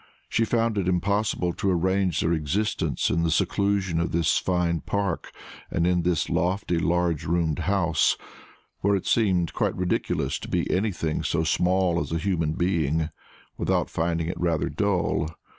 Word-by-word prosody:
She 115 - +2
found 115 -2 +1
it 90 - -1
impossible 95 0 0
to 100 - -1
arrange 95 -1 +1
their 80 - +1
existence 90 +8 0
in 85 - +1
the 85 - +1
seclusion 95 +1 +1
of 85 - -1
this 85 -2 +2
fine 90 -2 0
park 100 -4 -2 0.4
and 85 - 0
in 90 0 +2
this 85 -2 0
lofty 90 -1 0
large 85 -2 +1
roomed 85 -1 0
house, 85 -1 +2 0.6
where 100 +1 +2
it 95 - -3
seemed 95 -7 +2
quite - - 0
ridiculous 90 -1 -1
to - - -8
be - - 0
anything 90 -5 -1
so 80 -1 0
small 90 +1 +2
as - - -4
a 85 - 0
human 85 -3 0
being, 80 -3 0 0.5
without - - 0
finding 85 0 -1
it 90 - -4
rather 85 -3 +1
dull. 90 -6 0
90 Hz, 160 wpm, -25 LUFS, 85-95 Hz, 0.6 s, She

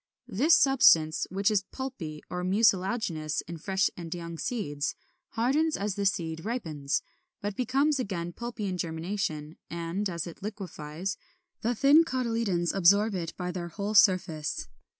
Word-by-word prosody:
This 290 - +4
substance, 165 - +5
which 200 +3 +1
is 205 -3 +2
pulpy 185 - -6
or 180 0 -4
mucilaginous 190 - +1
in 170 0 -8
fresh 190 +3 +1
and 170 -2 -8
young 170 -1 -5
seeds, 150 - -2 0.4
hardens 285 +8 +1
as 205 0 -1
the 200 +1 +1
seed 165 -3 -2
ripens, 160 - -2 0.4
but 205 0 -4
becomes 270 +5 +1
again 175 -7 -3
pulpy 235 -1 -5
in 185 -2 -3
germination; 160 -2 -3
and, 170 +4 -2
as 170 -2 -3
it 170 - -10
liquefies, 190 -4 -5 0.4
the 240 +2 0
thin 285 +7 +6
cotyledons 230 - 0
absorb 200 +3 +4
it 170 -3 -4
by 180 -1 -3
their 175 -1 -4
whole 200 +5 -4
surface. 185 -7 +3
190 Hz, 145 wpm, -28 LUFS, 170-225 Hz, 0.4 s, thin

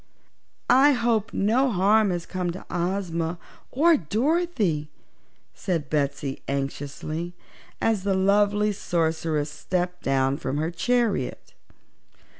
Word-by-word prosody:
"I 275 +3 +6
hope 230 -4 0
no 235 +7 +2
harm 205 +1 +3
has 175 -2 -2
come 180 -2 -3
to 185 - -9
Ozma, 175 -2 -2 0.3
or 320 +4 +4
Dorothy," 215 - 0 0.6
said 165 -6 -3
Betsy 140 -2 -1
anxiously, 145 +5 -4 0.4
as 225 -3 +1
the 195 0 0
lovely 205 +2 +3
Sorceress 160 -5 -1
stepped 180 +2 -3
down 135 0 +1
from 135 -1 -3
her 160 +3 -1
chariot. 220 - -1
180 Hz, 105 wpm, -25 LUFS, 155-215 Hz, 0.6 s, I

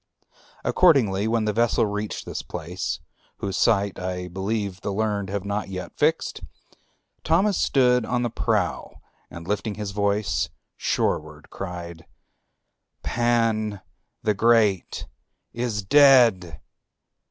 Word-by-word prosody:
Accordingly, 110 - +3
when 115 -1 +1
the 105 - 0
vessel 115 +1 +2
reached 105 0 -4
this - - -5
place, 90 +2 -5 0.4
whose 100 -1 -4
site 100 -3 +2
I 90 0 -4
believe 95 +1 -3
the 100 - -3
learned 100 -1 -1
have 100 0 -3
not 100 0 -3
yet 90 -1 -7
fixed, - - 0 0.8
Thamous 185 +6 +3
stood 125 -2 +3
on 125 +1 -1
the 120 - -1
prow - - -1 0.3
and 85 0 -10
lifting 105 +1 -2
his 105 -2 -5
voice 100 -3 0 0.3
shoreward 75 0 -2
cried, 85 -3 -7 1.0
"Pan 115 -3 +1 0.4
the 110 -1 +2
Great 110 -3 +2 0.5
is 120 -4 -2
dead!" 115 - +5
105 Hz, 115 wpm, -24 LUFS, 95-115 Hz, 1.0 s, dead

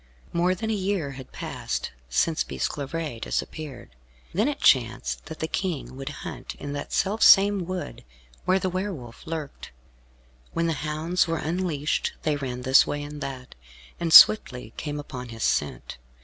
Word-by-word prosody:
More 180 +2 +2
than 220 +4 -3
a - - +1
year 190 -7 -1
had 130 -1 -10
passed - - -4 0.2
since 155 - +1
Bisclavaret 145 -3 -4
disappeared. 140 -7 -4 0.4
Then 210 +8 +2
it 290 - -2
chanced 125 -1 +2
that 160 0 -7
the 160 - 0
King 165 -7 -3
would 135 0 -5 0.2
hunt - - -7
in 145 0 -6
that 145 0 -5
self 205 +3 0
same 195 -2 +6
wood 185 -1 -5 0.4
where 185 - +4
the 190 - -1
Were 185 +3 -2
Wolf 125 -2 -10
lurked. 160 -3 -6 0.8
When 170 - 0
the 165 - +1
hounds 155 +4 0
were 165 0 -1
unleashed 160 -2 -1
they 155 -2 +1
ran 125 -3 -4
this 130 +1 +6
way 145 0 -3
and 145 0 -8
that, 130 -2 -6 0.5
and 170 -1 -1
swiftly 125 - +7
came 150 -1 -4
upon 125 -4 -7
his 115 -1 -6
scent. - - -1
155 Hz, 165 wpm, -26 LUFS, 135-180 Hz, 0.8 s, swiftly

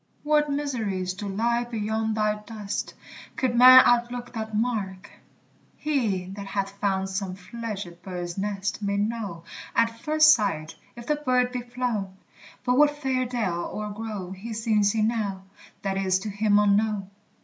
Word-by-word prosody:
What 300 0 +2
mysteries 220 -11 -2
do 205 +2 -6
lie 235 +4 0
beyond 220 -1 -2
thy 215 -1 +2
dust, 210 -1 -5 0.4
Could 255 -2 0
man 255 +1 +10
outlook 245 0 +1
that 220 -2 -4
mark! 205 -5 -2 0.7
He 230 -12 0
that 200 0 -7
hath 195 0 -2
found 195 -1 0
some 190 -1 -3
fledged 195 -3 -7
bird's 180 -2 -5
nest 200 +1 -3
may 200 -1 -1
know, 205 -5 -2 0.3
At 230 0 +2
first 310 +3 +6
sight, 165 -8 -1 0.2
if 235 0 -9
the 300 +2 +1
bird 250 -3 +1
be 250 -1 -3
flown; 240 -6 -3 0.5
But 250 +1 +2
what 295 0 +4
fair 260 -3 0
dell 205 -9 -2
or 210 0 -5
grove 205 -4 -5
he 225 +4 -6
sings 215 -2 +2
in 215 -1 +2
now, 205 -5 -2 0.4
That 195 -1 -1
is 190 -1 +2
to 210 - -4
him 205 0 +2
unknown. 205 -1 +2
215 Hz, 155 wpm, -26 LUFS, 195-240 Hz, 0.7 s, man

